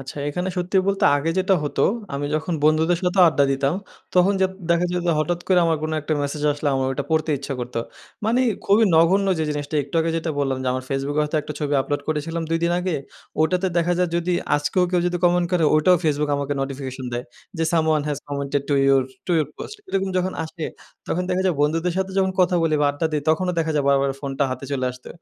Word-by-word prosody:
আচ্ছা, 135 Hz, +2 st, -9 dB
এখানে 180 Hz, +5 st, -2 dB
সত্যি 180 Hz, +2 st, -1 dB
বলতে 195 Hz, 0 st, +1 dB
আগে 150 Hz, +3 st, -1 dB
যেটা 190 Hz, +1 st, +3 dB
হতো 145 Hz, -, -1 dB, 0.3 s
আমি 145 Hz, +1 st, -2 dB
যখন 160 Hz, +3 st, -1 dB
বন্ধুদের 160 Hz, +3 st, +3 dB
সাথেও 180 Hz, +1 st, +3 dB
আড্ডা 145 Hz, -3 st, +2 dB
দিতাম, 135 Hz, +3 st, 0 dB, 0.4 s
তখন 180 Hz, +2 st, +5 dB
যা 190 Hz, -, +5 dB, 0.2 s
দেখা 170 Hz, +1 st, +3 dB
যায় 180 Hz, 0 st, -1 dB
যে -, -, +3 dB
হঠাৎ 170 Hz, +3 st, -1 dB
করে 185 Hz, -1 st, +5 dB
আমার 165 Hz, -1 st, +2 dB
কোনো 155 Hz, 0 st, -2 dB
একটা 155 Hz, +1 st, -3 dB
মেসেজ 145 Hz, +1 st, -3 dB
আসলে 145 Hz, +1 st, -2 dB
আমার 135 Hz, 0 st, 0 dB
ওটা 140 Hz, +1 st, -3 dB
পড়তে 155 Hz, 0 st, +1 dB
ইচ্ছা 140 Hz, 0 st, -5 dB
করত। 125 Hz, 0 st, -6 dB, 0.5 s
মানে 230 Hz, +4 st, +2 dB, 0.2 s
খুবই 210 Hz, +3 st, +4 dB
নগণ্য 185 Hz, +5 st, +4 dB
যে 160 Hz, -, 0 dB
জিনিসটা 145 Hz, +1 st, -3 dB
একটু 140 Hz, +3 st, -12 dB
আগে 165 Hz, +1 st, 0 dB
যেটা 165 Hz, 0 st, -2 dB
বললাম 135 Hz, -2 st, 0 dB
যে -, -, -4 dB
আমার 130 Hz, 0 st, -3 dB
Facebook 135 Hz, +1 st, -2 dB
এ -, -, +5 dB
হয়তো 150 Hz, +1 st, -1 dB
একটা 150 Hz, -, -6 dB
ছবি 145 Hz, -1 st, -1 dB
আপলোড 145 Hz, +2 st, -2 dB
করেছিলাম 160 Hz, +2 st, -2 dB
২ 165 Hz, -, +2 dB
দিন 170 Hz, -, +2 dB
আগে, 180 Hz, -2 st, -1 dB, 0.5 s
ওটাতে 180 Hz, +4 st, +1 dB
দেখা 170 Hz, +1 st, +2 dB
যায় 180 Hz, -1 st, +2 dB
যদি 175 Hz, +1 st, -1 dB, 0.2 s
আজকেও 180 Hz, +5 st, +1 dB
কেউ 180 Hz, -1 st, +2 dB
যদি 175 Hz, 0 st, 0 dB
কমেন্ট 175 Hz, 0 st, +3 dB
করে 175 Hz, -3 st, +3 dB
ওটাও 180 Hz, +4 st, +5 dB
Facebook 150 Hz, -1 st, +1 dB
আমাকে 140 Hz, 0 st, -2 dB
নোটিফিকেশন 135 Hz, -1 st, -5 dB
দেয়। 120 Hz, +1 st, -3 dB, 0.3 s
যে, 165 Hz, -, +1 dB
"Someone 160 Hz, -2 st, +2 dB
has 145 Hz, -2 st, -2 dB
commented 140 Hz, -1 st, -2 dB
to 145 Hz, -, +2 dB
your 135 Hz, -1 st, +5 dB, 0.2 s
to 180 Hz, -, 0 dB
your 150 Hz, -, 0 dB
post." 425 Hz, -, -8 dB
এরকম 195 Hz, 0 st, -1 dB
যখন 185 Hz, +1 st, 0 dB
আসে 160 Hz, 0 st, -7 dB, 0.4 s
তখন 180 Hz, -, 0 dB
দেখা 185 Hz, +1 st, +1 dB
যায় 180 Hz, -, +2 dB
বন্ধুদের 165 Hz, +4 st, +1 dB
সাথে 190 Hz, 0 st, -1 dB
যখন 190 Hz, 0 st, +2 dB
কথা 180 Hz, 0 st, +3 dB
বলি 160 Hz, -2 st, +2 dB
বা 145 Hz, -, +3 dB
আড্ডা 145 Hz, +3 st, -1 dB
দেই 150 Hz, -2 st, 0 dB
তখনও 180 Hz, +3 st, +1 dB
দেখা 160 Hz, -1 st, 0 dB
যায় 145 Hz, -, +1 dB
বারবার 140 Hz, 0 st, +3 dB
ফোনটা 140 Hz, 0 st, -1 dB
হাতে 130 Hz, +1 st, -5 dB
চলে 130 Hz, -2 st, -1 dB
আসতো। 125 Hz, 0 st, -12 dB
155 Hz, 230 wpm, -22 LUFS, 145-180 Hz, 0.5 s, তখন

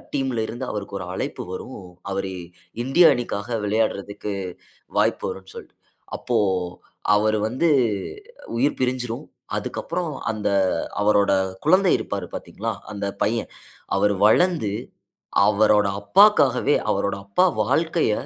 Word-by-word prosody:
டீம்ல 130 Hz, -5 st, 0 dB
இருந்து, 120 Hz, +3 st, -5 dB
அவருக்கு 100 Hz, -1 st, -5 dB
ஒரு 90 Hz, -, -6 dB
அழைப்பு -, -, -4 dB
வரும். 130 Hz, +6 st, -7 dB, 0.3 s
அவரு 95 Hz, -1 st, -2 dB, 0.5 s
இந்திய 160 Hz, +6 st, +6 dB
அணிக்காக 115 Hz, -1 st, -3 dB
விளையாடுறதுக்கு 105 Hz, -1 st, -1 dB, 0.6 s
வாய்ப்பு -, -, +2 dB
வரும்னு 95 Hz, 0 st, -9 dB
சொல்ட்டு. -, -, -10 dB, 0.4 s
அப்போ, 120 Hz, -, -1 dB, 0.8 s
அவரு 110 Hz, +1 st, +2 dB
வந்து 130 Hz, +9 st, +1 dB, 0.9 s
உயிர் 140 Hz, +5 st, +1 dB
பிரிஞ்சிரும். 125 Hz, -2 st, -2 dB, 0.3 s
அதுக்கப்பறம், 175 Hz, -4 st, -4 dB, 0.2 s
அந்த 105 Hz, -1 st, -1 dB, 0.5 s
அவரோட 105 Hz, -1 st, +4 dB, 0.4 s
குழந்தை 185 Hz, +2 st, +5 dB
இருப்பாரு -, -, -4 dB
பார்த்தீங்களா? 115 Hz, +2 st, -4 dB, 0.2 s
அந்த 100 Hz, -1 st, -3 dB, 0.2 s
பையன். 115 Hz, +2 st, -1 dB, 0.5 s
அவரு 105 Hz, 0 st, +3 dB
வளர்ந்து 155 Hz, -, +3 dB, 0.7 s
அவரோட 105 Hz, 0 st, +4 dB
அப்பாக்காகவே 145 Hz, -, +4 dB, 0.2 s
அவரோட 100 Hz, -1 st, 0 dB
அப்பா 100 Hz, -, +2 dB
வாழ்க்கைய, 165 Hz, -6 st, +1 dB
110 Hz, 110 wpm, -23 LUFS, 100-135 Hz, 0.9 s, இந்திய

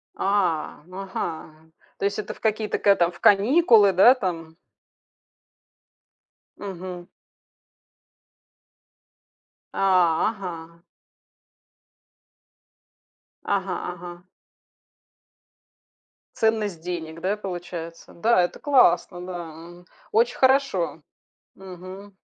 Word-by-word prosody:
А. 185 Hz, -7 st, -1 dB
Ага. 160 Hz, -4 st, -7 dB, 0.3 s
То -, -, -2 dB
есть, 200 Hz, +1 st, -1 dB
это 210 Hz, -, -5 dB
в -, -, -19 dB
какие-то 215 Hz, -1 st, -1 dB
ка 200 Hz, -1 st, +4 dB
там 170 Hz, 0 st, +1 dB
в 175 Hz, -, -16 dB
каникулы, 215 Hz, -, +5 dB
да 195 Hz, +8 st, +7 dB
там? 165 Hz, -7 st, -5 dB, 2.0 s
Мгм. 185 Hz, -2 st, -8 dB, 2.7 s
А! 180 Hz, -3 st, +3 dB
Ага. 170 Hz, -5 st, -8 dB, 2.6 s
Ага, 195 Hz, -1 st, -1 dB, 0.2 s
ага. 175 Hz, 0 st, -10 dB, 2.1 s
Ценность 215 Hz, -6 st, 0 dB
денег, 165 Hz, -2 st, -6 dB
да, 200 Hz, +4 st, -1 dB
получается? 175 Hz, -4 st, -7 dB
Да, 220 Hz, +2 st, +3 dB
это 175 Hz, -, -2 dB
классно, 250 Hz, -10 st, +2 dB
да, 175 Hz, 0 st, -9 dB, 0.3 s
очень 230 Hz, +3 st, +2 dB
хорошо. 260 Hz, -, +1 dB, 0.5 s
Мгм. 190 Hz, +2 st, -11 dB
185 Hz, 80 wpm, -24 LUFS, 170-205 Hz, 2.7 s, да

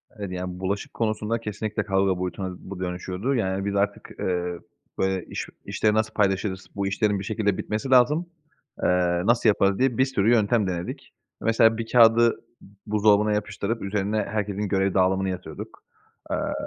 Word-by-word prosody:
Evet, 100 Hz, -4 st, -6 dB
yani, 90 Hz, 0 st, -5 dB
bulaşık 100 Hz, +2 st, -3 dB
konusunda 110 Hz, 0 st, -1 dB
kesinlikle 110 Hz, -1 st, -3 dB
kavga 95 Hz, -2 st, +1 dB
boyutuna 90 Hz, 0 st, -4 dB
bu 95 Hz, -1 st, -9 dB
dönüşüyordu. 90 Hz, +7 st, -2 dB
Yani, 95 Hz, -3 st, -1 dB
biz 100 Hz, 0 st, -2 dB
artık, 100 Hz, +1 st, -1 dB
ııı, 90 Hz, -1 st, -2 dB, 0.4 s
böyle, 95 Hz, -2 st, 0 dB
"İş -, -, -5 dB, 0.2 s
işleri 105 Hz, -1 st, +1 dB
nasıl 110 Hz, 0 st, 0 dB
paylaşırız, 95 Hz, -1 st, 0 dB
bu 100 Hz, 0 st, -1 dB
işlerin 100 Hz, 0 st, +1 dB
bir -, -, -5 dB
şekilde 105 Hz, -2 st, 0 dB
bitmesi 110 Hz, +5 st, -3 dB
lazım, 130 Hz, +6 st, +4 dB, 0.6 s
ııı, 90 Hz, +1 st, +2 dB
nasıl 120 Hz, -2 st, +4 dB
yaparız?" 100 Hz, -1 st, +2 dB
diye 130 Hz, -3 st, +2 dB
bir 130 Hz, -, +4 dB
sürü 115 Hz, -4 st, +1 dB
yöntem 110 Hz, -2 st, +3 dB
denedik. 120 Hz, -, -5 dB, 0.3 s
Mesela 115 Hz, 0 st, +4 dB
bir 115 Hz, -1 st, -5 dB
kâğıdı 115 Hz, -1 st, +6 dB, 0.3 s
b -, -, -15 dB, 0.2 s
buzdolabına 105 Hz, 0 st, +3 dB
yapıştırıp 105 Hz, +2 st, -2 dB
üzerine 100 Hz, +1 st, -1 dB
herkesin 105 Hz, -1 st, -2 dB
görev 95 Hz, -1 st, +1 dB
dağılımını 95 Hz, 0 st, +2 dB
yazıyorduk. 90 Hz, -4 st, -7 dB, 0.5 s
Iıı, -, -, -1 dB
100 Hz, 160 wpm, -25 LUFS, 95-110 Hz, 0.6 s, kâğıdı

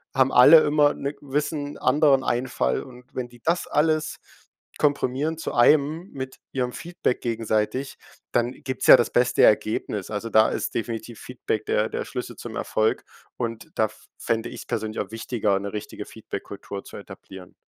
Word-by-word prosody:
haben 135 Hz, 0 st, +4 dB
alle 155 Hz, +6 st, +9 dB
immer 145 Hz, -1 st, +3 dB
'ne 140 Hz, +1 st, -4 dB
gewissen 145 Hz, +1 st, -3 dB
anderen 145 Hz, -3 st, +3 dB
Einfall 120 Hz, -, 0 dB
und 125 Hz, -1 st, -13 dB
wenn 125 Hz, -1 st, -4 dB
die 120 Hz, -1 st, -18 dB
das 170 Hz, +2 st, 0 dB
alles 155 Hz, +1 st, +1 dB, 0.6 s
komprimieren 145 Hz, +1 st, 0 dB
zu 165 Hz, -, -5 dB
einem 155 Hz, +8 st, +3 dB
mit 130 Hz, -1 st, -7 dB
ihrem 125 Hz, -2 st, -1 dB
Feedback 170 Hz, -7 st, -2 dB
gegenseitig, 115 Hz, +2 st, -1 dB, 0.4 s
dann 120 Hz, 0 st, +1 dB
gibt's 130 Hz, -2 st, -4 dB
ja -, -, +11 dB
das 120 Hz, -2 st, 0 dB
beste 125 Hz, 0 st, +3 dB
Ergebnis. 105 Hz, -2 st, +2 dB
Also, 110 Hz, +2 st, -4 dB
da 110 Hz, 0 st, +5 dB
ist -, -, -3 dB
definitiv 115 Hz, 0 st, -4 dB
Feedback 110 Hz, -3 st, -4 dB
der 105 Hz, +1 st, +1 dB
der -, -, -4 dB
Schlüssel -, -, -6 dB
zum -, -, -8 dB
Erfolg 110 Hz, 0 st, 0 dB, 0.3 s
und 115 Hz, -2 st, -4 dB
da 110 Hz, -, +3 dB
f 110 Hz, 0 st, -11 dB
fände 115 Hz, -1 st, -2 dB
ich's 120 Hz, -, -9 dB
persönlich 110 Hz, 0 st, -3 dB
auch -, -, -4 dB
wichtiger, 110 Hz, -3 st, -1 dB
'ne 100 Hz, 0 st, -6 dB
richtige 105 Hz, -, -6 dB
Feedbackkultur 100 Hz, -1 st, -8 dB
zu -, -, -11 dB
etablieren. 95 Hz, -2 st, -12 dB
125 Hz, 165 wpm, -24 LUFS, 110-145 Hz, 0.6 s, ja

